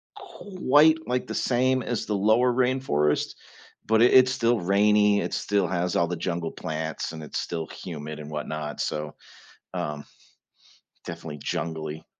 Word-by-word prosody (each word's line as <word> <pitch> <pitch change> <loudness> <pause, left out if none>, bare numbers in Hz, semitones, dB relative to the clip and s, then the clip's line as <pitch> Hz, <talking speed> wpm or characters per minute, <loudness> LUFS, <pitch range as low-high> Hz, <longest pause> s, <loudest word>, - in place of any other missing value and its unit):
quite 180 - +2
like 125 0 -1
the - - -5
same 130 +1 +1
as 120 -3 -2
the 105 - -2
lower 110 +5 +3
rainforest, 125 - +1 0.5
but 110 +1 +3
i - - +8
it's 130 0 +6
still 120 -2 +1
rainy, 105 +2 +3
it - - -4
still 100 -3 0
has 90 -1 -1
all 85 - +2
the 90 - -3
jungle 85 0 -3
plants 80 0 -4
and 80 -1 -7
it's - - -4
still 80 -2 -4
humid 75 -3 -7
and 75 0 -8
whatnot, 75 0 -5
so, 75 0 -3 0.6
um, 75 -1 -4 1.0
definitely 80 -3 -7
jungly. 80 0 -4
90 Hz, 150 wpm, -26 LUFS, 80-125 Hz, 1.0 s, i